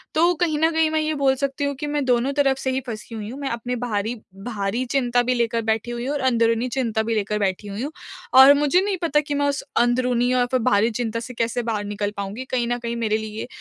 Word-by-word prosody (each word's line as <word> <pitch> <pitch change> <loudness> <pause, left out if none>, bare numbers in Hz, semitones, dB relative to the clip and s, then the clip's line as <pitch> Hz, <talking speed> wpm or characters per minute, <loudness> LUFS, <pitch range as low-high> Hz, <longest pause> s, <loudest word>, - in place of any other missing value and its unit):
तो 340 +3 +4
कहीं 310 -3 0
न 320 - +4
कहीं 320 -1 +2
मैं 315 - +1
ये 310 0 -1
बोल 275 -2 +2
सकती 275 +1 -2
हूँ 280 0 -1
कि 295 - -3
मैं 290 -1 -1
दोनों 250 +2 +2
तरफ 275 -2 +2
से 260 -1 -2
ही 265 +1 -1
फँसी 225 0 -7
हुई 210 -1 -6
हूँ, 260 +4 -8
मैं 275 -1 -3
अपने 235 +2 -3
बाहरी 220 0 -1 0.3
बाहरी 220 +2 -2
चिंता 245 -2 +2
भी 250 +1 +1
लेकर 230 -1 0
बैठी 225 +2 -2
हुई 240 +1 -4
हूँ 285 - -1
और 280 - -2
अंदरूनी 230 0 +2
चिंता 225 -4 0
भी 225 0 -1
लेकर 210 0 -1
बैठी 195 0 -1
हुई 205 +3 -5
हूँ। 290 - -4 0.5
और 270 +2 +10
मुझे 295 +5 +3
नहीं 400 -1 -1
पता 300 -3 +2
कि 295 -1 -3
मैं 285 0 +1
उस 280 - -2 0.2
अंदरूनी 245 0 +2
और 250 -1 +3
फिर 255 - +2
बाहरी 205 +2 +3
चिंता 230 -1 -2
से 250 +2 -8
कैसे 235 +1 -1
बाहर 220 -3 -2
निकल 205 0 -3
पाऊँगी? 200 +6 -5
कहीं 250 -2 -1
न 240 0 0
कहीं 235 0 -4
मेरे 220 -2 0
लिए 220 +1 -6
245 Hz, 255 wpm, -23 LUFS, 225-275 Hz, 0.5 s, और